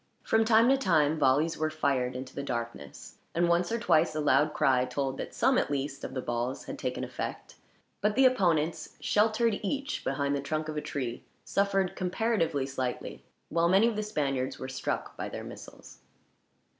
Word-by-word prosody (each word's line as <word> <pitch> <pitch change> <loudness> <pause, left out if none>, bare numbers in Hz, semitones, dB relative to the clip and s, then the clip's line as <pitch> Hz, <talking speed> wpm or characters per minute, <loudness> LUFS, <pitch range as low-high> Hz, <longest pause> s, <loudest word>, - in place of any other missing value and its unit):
From 225 0 +3
time 225 +1 +5
to 270 - +5
time 160 - +2
volleys 150 +4 +2
were 155 0 +1
fired 135 -5 0
into 130 +1 -6
the - - -4
darkness; 120 - -6 0.2
and 170 +1 +3
once 170 +2 +2
or 230 - +1
twice 160 -8 +2
a - - -1
loud 150 0 +3
cry 135 -4 +3
told 135 +1 -2
that - - -6
some, 265 -1 +3
at - - -1
least, 140 0 -3
of - - -6
the 130 - -3
balls 120 +2 -2
had - - -7
taken - - -3
effect; - - -5 0.5
but 210 +1 +1
the 265 - +5
opponents, 170 -10 +1
sheltered 220 +1 +2
each 275 +8 -3
behind 140 +1 0
the 140 - -2
trunk 155 +2 -2
of 155 - -4
a 150 - -1
tree, 125 -5 -4 0.2
suffered 195 -2 +1
comparatively 180 - 0
slightly, 130 -2 -4 0.3
while 170 +1 +2
many 195 +5 +5
of 235 - -1
the 215 - -1
Spaniards 140 -10 -2
were 130 - -6
struck 130 0 -3
by - - -4
their - - -6
missiles. - - -11
155 Hz, 185 wpm, -29 LUFS, 135-200 Hz, 0.5 s, time